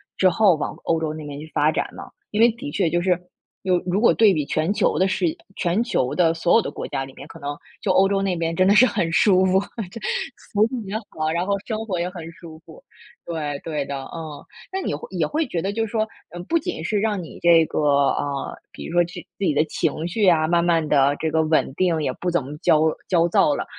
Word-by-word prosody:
之 185 - +4
后 195 0 +4
往 150 - -4
欧 165 -1 0
洲 155 -1 -1
那 155 -1 -7
边 145 0 -7
去 155 - -9
发 150 +1 +3
展 - - -1
了。 - - -10 0.2
因 210 - -3
为 235 +1 +7
的 270 +6 -7
确 185 -4 +1
就 175 +1 0
是 180 -1 +1 0.4
有 180 -2 +2
如 185 +3 0
果 235 - +5
对 220 -3 +5
比 150 -3 -1
全 155 +6 0
球 - - +1
的 190 - +4
视 190 - 0 0.3
全 185 +5 +1
球 130 - -1
的 165 -2 +3
所 170 +1 +1
有 230 - +6
的 - - -4
国 - - -6
家 135 - -3
里 135 - -12
面， 140 - -10
可 165 - -12
能 145 +1 -5 0.2
就 190 - +1
欧 190 +1 +5
洲 195 0 0
那 190 -2 0
边 165 0 -2
真 185 +2 +3
的 205 - +5
是 255 - +8
很 190 -9 -1
舒 190 +2 +4
服， 190 +1 +3 0.3
这 230 - -9 0.5
服 205 - 0
务 230 +1 0
也 200 - -5 0.2
好， 155 0 -2
然 175 +2 -1
后 200 - +1
生 220 -2 -2
活 185 -5 -2
也 175 - -1
很 165 -3 -8
舒 165 -1 -12
服。 - - -15 0.4
对， 150 -4 -3
对 150 -4 -3
的， 140 -1 -4
嗯。 155 -3 -7 0.3
那 385 - -2
你 - - -2
会 475 - -7
也 - - 0
会 310 0 -1
觉 170 -8 -3
得 195 - -1
就 225 +1 -1
是 - - -11
说 220 -2 0 0.4
不 335 - +3
仅 160 - -5
是 205 +3 0
让 205 -4 -1
你 165 - -10
这 170 -1 +6
个， 140 -2 +2
啊， 140 -1 -3 0.2
比 - - -9
如 - - -7
说 175 0 +4
自 170 - -11 0.2
己 190 -7 +1
的 150 +2 +3
情 160 +1 -2
绪 205 +2 +2
啊， 155 -3 +4
慢 170 +1 +2
慢 165 -2 +2
地 140 -1 +3
这 160 - -1
个 160 0 +2
稳 155 -3 +1
定， 170 -3 +1
也 130 - -1
不 180 - -2
怎 175 -6 0
么 145 +3 -7
焦 155 -3 +3 0.3
焦 170 -2 +3
躁 150 -3 +3
了。 - - -3
170 Hz, 270 characters per minute, -22 LUFS, 155-195 Hz, 0.5 s, 是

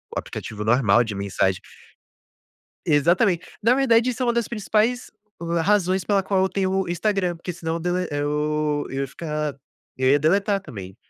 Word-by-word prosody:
aplicativo 105 -1 -5
normal 120 0 +4
de 110 -3 -5
mensagem. 95 -1 0 1.3
Exatamente, 170 +5 +2 0.2
na 235 +3 +4
verdade, 250 -3 +3
isso 250 +1 -4
é - - +1
uma 240 - +3
das 235 -2 -1
principais 225 +2 0 0.5
razões 190 -1 +2
pela 200 -2 +2
qual 190 -1 +1
eu 190 - +2
tenho 190 -1 -1
o 190 -1 0
Instagram, 180 0 0
porque 180 +2 -6
senão 165 -1 -4
dele 180 +1 -1
eu 150 0 -1
eu 135 - -3
ia 140 - -1
ficar, 150 -1 -4 0.4
eu 130 0 +1
ia 145 - +5
deletar 195 +6 +2
também 100 - -9
175 Hz, 160 wpm, -23 LUFS, 145-200 Hz, 1.3 s, ia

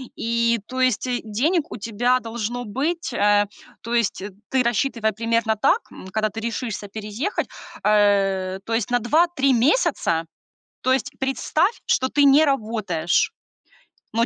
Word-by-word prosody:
И, 235 0 +1
то 255 0 -3
есть, 255 -1 +1
э, 245 -1 -1
денег 285 - 0
у - - -5
тебя 235 +4 +1
должно 235 +1 -4
быть, 285 +7 -2
э 205 -1 +3 0.4
То 230 - -5
есть, 230 -5 0
э, 205 +2 -6 0.2
ты 260 -1 +2
рассчитывай 235 -2 0
примерно 230 0 0
так, 280 - +3
м, - - -11
когда 215 +3 -1
ты 220 - -7
решишься 225 -2 -4
переехать, 215 - -3 0.4
а, 195 -3 +2
то 230 - -3
есть 225 0 -1
на 245 - +3
2-3 275 +1 +2
месяца. 235 - +2 0.6
То 260 - +2
есть 270 +2 -1
представь, 310 - 0
что 260 - +2
ты 285 +2 +2
не 285 +3 +6
работаешь, 215 - 0 0.8
но 230 +1 +2
235 Hz, 150 wpm, -22 LUFS, 210-265 Hz, 0.8 s, не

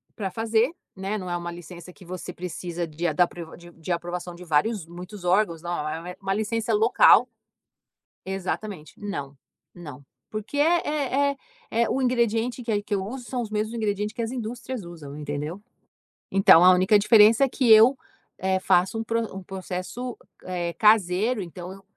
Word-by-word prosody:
para 195 -3 -4
fazer, 225 - +1 0.2
né, 195 +2 -3
não 185 -3 -6
é 175 - -1
uma 175 0 -5
licença 175 +1 -11
que 185 - -16
você 180 +1 -7
precisa 175 -1 -5
de 160 +2 -5
a - - 0
da 180 -1 +4
pr 175 - -10 0.2
de 175 0 -9
aprovação 175 +1 -3
de 175 +1 -11
vários 170 +4 +1
muitos 180 +3 -10
órgãos, 180 -3 +2
não, 175 -3 -3
é 165 +3 -5
uma 195 0 -1
licença 220 +2 -1
local. 220 +3 +5 1.0
Exatamente, 190 -3 -5
não, 145 -10 -5 0.4
não. 145 -6 -11 0.2
Porque 215 +6 -5
é 290 -4 +2
é 280 - -9 0.5
é - - -1
o 270 - 0
ingrediente 240 -1 0
que 230 - -3
é 205 -1 +1
que 205 - -5
eu 190 - -2
uso, 245 +4 -7
são 250 -2 -2
os 225 - -5
mesmos 215 +1 -2
ingredientes 210 -2 -2
que 235 - -4
as 230 0 -3
indústrias 245 -1 -5
usam, 155 -5 -10
entendeu? 150 +5 -5 0.7
Então 195 -3 +7
a 185 - +9
única 190 +4 +4
diferença 215 +4 +6
é - - +1
que 250 -2 +1
eu, 225 +5 +7 0.4
eh, 190 0 +1
faço 185 +4 +2
um 225 - -2
pr 230 +1 -1
um 195 - -7
processo 190 +6 -6 0.6
caseiro 210 +2 +3
então, 180 +2 -9
195 Hz, 170 wpm, -25 LUFS, 175-225 Hz, 1.0 s, a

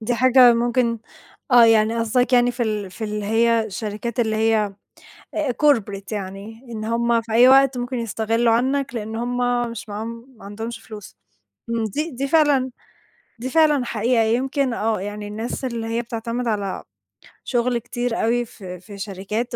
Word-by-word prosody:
دي 235 +2 -1
حاجة 250 0 +6
ممكن 235 0 +1 0.5
آه، 240 -1 +8
يعني 225 0 +4
قصدك 245 +3 +1
يعني 245 0 +5
في 240 0 -3
ال 210 -4 -2
في 220 - -6
اللي 210 -1 -3
هي 230 0 +2
شركات 215 +4 -4
اللي 220 -2 0
هي 220 -2 +1 0.6
آآ 300 -5 0
Corporate 210 -8 +1
يعني، 205 +3 -6
إن 215 -2 -5
هُم 235 +1 +1
في 225 -1 -8
أي 240 +3 +7
وقت 270 -1 +5
ممكن 245 +1 -3
يستغلوا 230 +1 0
عنك، 265 +2 0
لإن 220 0 -4
هُم 245 0 -1
مش 230 -1 -8
معاهم، 230 +4 -7
ما 195 - -14
عندهُمش 225 +3 -6
فلوس، 210 - -11 0.5
امم، 230 -1 0
دي 300 - -3
دي 275 0 -3
فعلًا 290 -4 +3 0.7
دي 255 +3 -5
فعلًا 300 -4 +3
حقيقة، 235 0 +1
يمكن 260 +3 0
آه، 220 -3 -1
يعني 205 +1 -6
الناس 220 +5 -5
اللي 235 -3 -3
هي 230 +1 -1
بتعتمد 235 +1 -4
على 205 -3 -2 0.6
شُغل 245 0 0
كتير 240 0 -3
أوي 240 +2 +1
في 185 -5 -10
في 200 +2 -12
شركات، 210 +4 -4
230 Hz, 165 wpm, -22 LUFS, 215-245 Hz, 0.7 s, آه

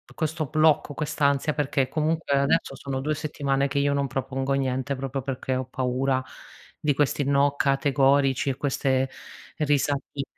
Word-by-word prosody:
questo 160 0 -2
blocco, 155 0 +3
quest'ansia, 145 0 0
perché 140 -3 0
comunque 155 -1 0
adesso 140 0 +1
sono 135 -1 -4
2 150 +3 0
settimane 140 -3 -1
che 140 - -1
io 140 0 +2
non 140 -1 0
propongo 135 +1 -2
niente 135 0 -1
proprio 135 0 -4
perché 130 0 -3
ho 130 0 -2
paura 130 +1 -1 0.6
di 150 -1 +1
questi 145 0 +1
no 140 +1 +3
categorici 135 -1 +2
e 130 - -2
queste 135 -2 0 0.5
risatine. 145 -2 0
140 Hz, 145 wpm, -25 LUFS, 135-145 Hz, 0.6 s, blocco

